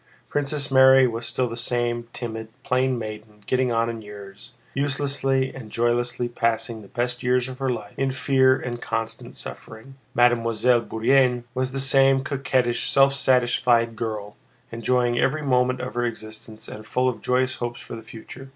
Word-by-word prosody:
Princess 145 -1 -1
Mary 130 0 +7
was 115 -1 -3
still 125 +2 0
the 115 - -6
same 120 0 -1
timid, 110 -2 -6 0.2
plain 130 0 +1
maiden 105 -1 -8
getting 130 -1 +1
on 115 0 +1
in 115 -1 -5
years, 100 -2 -12 0.2
uselessly 135 -1 0
and 120 -5 -9
joylessly 120 +1 0
passing 115 -1 -1
the 100 - -13
best 125 +3 -3
years 125 0 +1
of 130 -1 -9
her 135 -1 -1
life 105 -4 -4
in 135 0 0
fear 130 0 +3
and 120 -1 -5
constant 115 0 -4
suffering. 115 +5 -9 0.2
Mademoiselle 120 0 +3
Bourienne 125 +2 +2
was 130 0 -1
the 135 - -3
same 135 0 +4
coquettish, 130 -4 0
self 135 0 +5
satisfied 120 -3 +2
girl, 105 -3 -5 0.4
enjoying 120 +1 +1
every 155 +3 +1
moment 125 -2 +2
of 125 0 -5
her 120 - -1
existence 110 -1 -8
and 110 0 -10
full 125 +4 +1
of 125 - -2
joyous 130 0 0
hopes 120 0 -4
for - - -9
the 115 - -8
future. 115 +4 -11
120 Hz, 165 wpm, -24 LUFS, 115-130 Hz, 0.4 s, Mary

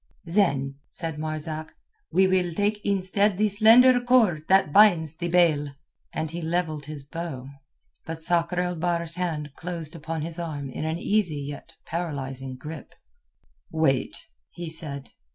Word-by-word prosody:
"Then," 140 -7 +1
said 160 -3 -5
Marzak, 155 0 -5 0.4
"we 190 +1 +4
will 185 -2 +1
take 205 +3 0
instead 200 0 +1
the 215 +1 +3
slender 230 +5 +6
cord 220 -11 +3
that 190 -6 +4
binds 175 -7 +5
the 170 +1 -3
bale." 155 -5 +2 0.4
And 155 -1 -3
he 170 +1 -5
levelled 160 -3 -2
his 150 -2 -7
bow. 140 -2 -6 0.6
But 160 0 -6
Sakr 175 +1 +1
el 180 -1 -2
Bahr's 170 0 0
hand 160 -5 -3
closed 165 0 -6
upon 160 0 -4
his 165 +1 -6
arm 145 -5 -4
in 155 - -4
an 160 +1 -1
easy 175 -6 0
yet 145 +1 -8
paralyzing 135 -6 -4
grip. 150 +1 -9 0.8
"Wait," 160 -5 +1 0.3
he 170 -2 -7
said. 145 -4 -3
165 Hz, 145 wpm, -25 LUFS, 150-180 Hz, 0.8 s, slender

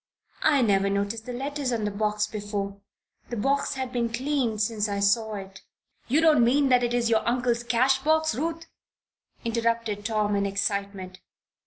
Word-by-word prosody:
"I 285 -4 +4
never 200 -2 +2
noticed 200 +3 -2
the - - -4
letters 275 +1 -3
on 225 -3 -1
the 210 - -1
box 210 +1 0
before. 205 -2 -5 0.5
The 240 - -4
box 275 +7 0
has 260 -2 -4
been 240 -2 -1
cleaned 250 -3 -1
since 210 0 0
I 200 0 -2
saw 215 +2 +1
it 195 -1 -9 0.2
" - - -40
"You 285 +6 +3
don't 310 -6 +5
mean 270 +4 +3
that 250 -1 +4
it 240 0 0
is 235 -1 +1
your 220 - +4
uncle's 240 -1 0
cash 250 +3 +2
box, 315 0 +2
Ruth?" 330 +6 -3 0.8
interrupted 230 -2 -1
Tom, 210 -1 0
in 200 0 +1
excitement. 200 -2 -3
230 Hz, 175 wpm, -26 LUFS, 205-255 Hz, 0.8 s, don't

